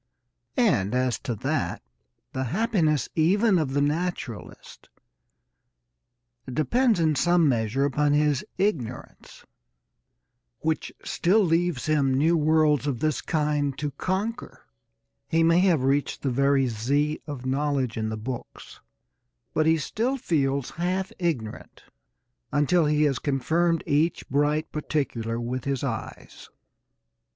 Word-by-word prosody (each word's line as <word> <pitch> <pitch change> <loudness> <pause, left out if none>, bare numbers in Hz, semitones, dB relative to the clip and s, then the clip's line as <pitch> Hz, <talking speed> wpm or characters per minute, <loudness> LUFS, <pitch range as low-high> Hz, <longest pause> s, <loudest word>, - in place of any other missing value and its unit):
And, 125 - +2
as 125 -1 0
to 120 -4 -4
that, 140 +6 -2 0.5
the 130 0 -2
happiness 165 - +1
even 190 +5 +3
of 140 -4 -2
the 145 - +3
naturalist 150 - -4 1.6
depends 225 - +2
in 160 -2 +3
some 175 +2 +3
measure 120 +1 +1
upon 145 +1 +1
his 150 -2 +2
ignorance, 145 - -3 1.2
which 160 0 -1
still 205 +5 +2
leaves 165 -4 0
him 140 -4 +2
new 160 +5 +3
worlds 155 -2 +3
of 130 -5 -1
this 155 +1 0
kind 150 -3 -1
to 145 -1 -3
conquer. 205 - -4 0.6
He 165 0 +2
may 165 +1 +4
have 175 -7 +3
reached 140 +2 0
the 135 - 0
very 140 +1 +3
Z 140 +7 0
of 140 -4 -6
knowledge 135 -2 0
in 110 -1 -2
the 110 - -4
books, 120 +3 -8 0.7
but 155 0 +2
he 160 0 +4
still 235 - -1
feels 140 - 0
half 185 +2 -2
ignorant 145 -12 -4 0.7
until 150 +3 +2
he 150 0 +2
has 140 -4 +1
confirmed 160 +5 0
each 160 +4 0
bright 145 +3 +1
particular 125 -7 -2
with 120 +2 -4
his 140 -1 -2
eyes. 115 -6 -6
150 Hz, 125 wpm, -25 LUFS, 130-165 Hz, 1.6 s, may